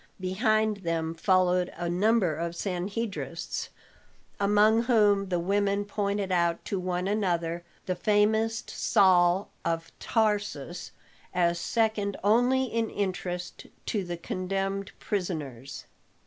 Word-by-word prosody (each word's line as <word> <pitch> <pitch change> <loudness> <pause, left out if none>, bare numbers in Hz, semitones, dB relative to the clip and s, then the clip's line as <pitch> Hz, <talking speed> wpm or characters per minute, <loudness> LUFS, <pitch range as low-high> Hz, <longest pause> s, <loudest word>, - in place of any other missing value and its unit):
Behind 215 +3 +1
them 165 -3 -2
followed 180 +1 +2
a 175 0 -3
number 190 0 +2
of 170 +2 -3
Sanhedrists, 200 +4 -3 0.7
among 210 +3 +4
whom 205 -5 +3
the 175 -2 0
women 200 +2 +1
pointed 200 -1 -2
out 170 -1 +1
to 195 - -2
one 180 0 -2
another 175 -5 -1 0.2
the 185 - 0
famous 220 +4 +2
Saul 185 0 +3
of 165 0 -2
Tarsus, 205 - -1 0.4
as 170 -1 +2
second 215 -1 0
only 245 +5 +4
in 230 -3 -1
interest 180 -2 -4 0.2
to 205 -3 -1
the 175 -1 -5
condemned 195 +3 -3
prisoners. 150 - -4
195 Hz, 110 wpm, -28 LUFS, 175-210 Hz, 0.7 s, among